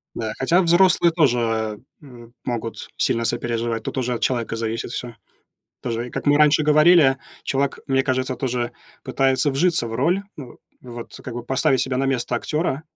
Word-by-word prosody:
Да. 110 -2 -3
Хотя 170 +8 +3
взрослые 175 0 +4
тоже 115 -8 +1 0.2
м 120 -5 -14
могут 115 -2 -5
сильно 115 0 +1
сопереживать. 115 -1 -2
Тут - - -5
уже 125 -1 -1
от 120 - -4
человека 120 -3 -1
зависит 115 0 -3
всё. 120 -1 -6 0.7
Тоже, 120 0 -3
и - - -13
как - - -5
мы 145 0 +5
раньше 150 0 +5
говорили, 150 -2 +5 0.3
человек, 135 0 -1
мне 135 0 +2
кажется, 130 -1 -1
тоже 125 -2 -2 0.3
пытается 135 +2 +1
вжиться 160 -1 +1
в 115 - -6
роль. 170 +11 +1
Ну 130 -5 -10 0.2
вот 120 -2 -9
как 125 - -7
бы 120 - -5
поставить 135 +1 +1
себя 130 +1 -1
на 135 +1 0
место 125 -2 -1
актёра, 150 +3 -2
130 Hz, 170 wpm, -22 LUFS, 120-145 Hz, 0.7 s, мы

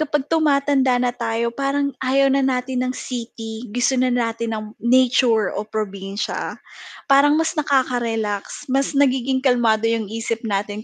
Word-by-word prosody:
kapag 295 -2 -1
tumatanda 280 -4 +3
na 245 0 0
tayo 230 0 -2
parang 280 0 -1
ayaw 270 +1 +3
na 275 - +3
natin 255 -1 -1
ng 255 - -3
city 230 -2 -6
gusto 245 +3 +1
na 255 - +2
natin 230 -2 -1
ng 215 - -6 0.2
nature 240 -2 +3
o 205 - -2
probinsya. 200 -2 -4 0.5
Parang 280 +1 +5
mas 325 0 -1
nakaka-relax, 240 -9 -1
mas 270 +1 +1
nagiging 265 -2 +2
kalmado 230 -4 +2
yung 230 -1 0
isip 225 +1 -3
natin 205 +1 -3
245 Hz, 145 wpm, -21 LUFS, 225-275 Hz, 0.5 s, Parang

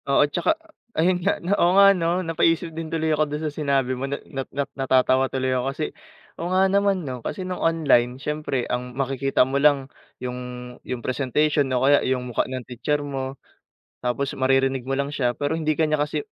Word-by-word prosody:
Oo, 140 +1 +5
'tsaka 320 - 0 0.4
ayun 180 +3 +2
nga 195 +3 +1
na, 190 - +2
oo 180 +2 +4
nga 200 0 +8
'no, 175 0 0
napaisip 165 +1 +1
din 160 0 -5
tuloy 160 -1 0
ako 155 0 +1
do'n 150 +2 -4
sa 150 - -2
sinabi 140 -4 0
mo 130 +2 -4
na 140 - -2 0.2
na 135 - -2
na 140 +1 -1
natatawa 130 0 +2
tuloy 130 -1 -1
ako 125 0 0
kasi, 150 +3 -3 0.6
oo, 170 - -2
nga 185 +1 +4
naman, 195 -2 +2
'no, 125 -3 -5
kasi 170 +10 -4
no'ng 185 0 -4
online 140 -7 +3
siyempre 150 -3 -2
ang 125 0 -4
makikita 135 -1 +1
mo 135 +2 -1
lang 145 -2 +4 0.3
'yung 125 0 -5 0.5
'yung 125 -2 -4
presentation 140 +2 +1
o 130 0 +1
kaya 145 +1 +5
'yung 130 -1 -1
mukha - - 0
ng 130 -2 -5
teacher 125 +4 -1
mo, 135 -1 -4 0.7
tapos 135 +3 -1
maririnig 135 -1 +2
mo 135 - -2
lang 140 +1 -1
siya 125 -4 0
pero 145 +5 -2
hindi 155 -1 +1
ka 155 0 +1
niya 155 - +2
kasi, 145 0 -1
140 Hz, 200 wpm, -24 LUFS, 130-160 Hz, 0.7 s, nga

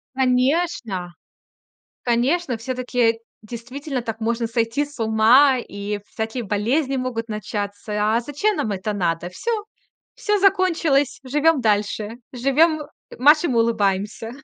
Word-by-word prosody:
Конечно. 255 - 0 0.9
Конечно. 250 +4 +1
Всё-таки, 245 -1 0 0.2
действительно, 255 +5 -6
так 225 -1 -5
можно 230 +1 -1
сойти 230 +4 0
с 290 -2 -14
ума, 230 +5 +5
и 205 -3 -5
всякие 225 +2 -4
болезни 250 +8 0
могут 240 -3 -3
начаться. 210 0 -2
А - - +2
зачем 290 - -1
нам 215 - -1
это 195 +2 -3
надо? 175 -3 -1
Всё. 445 - -4 0.6
Всё 420 -1 0
закончилось, 335 -8 +2
живем 295 +2 +2
дальше, 210 0 0 0.2
живем, 300 +6 +3 0.4
"машем 300 +4 +5
и - - 0
улыбаемся". 215 -1 0
235 Hz, 115 wpm, -22 LUFS, 215-280 Hz, 0.9 s, ума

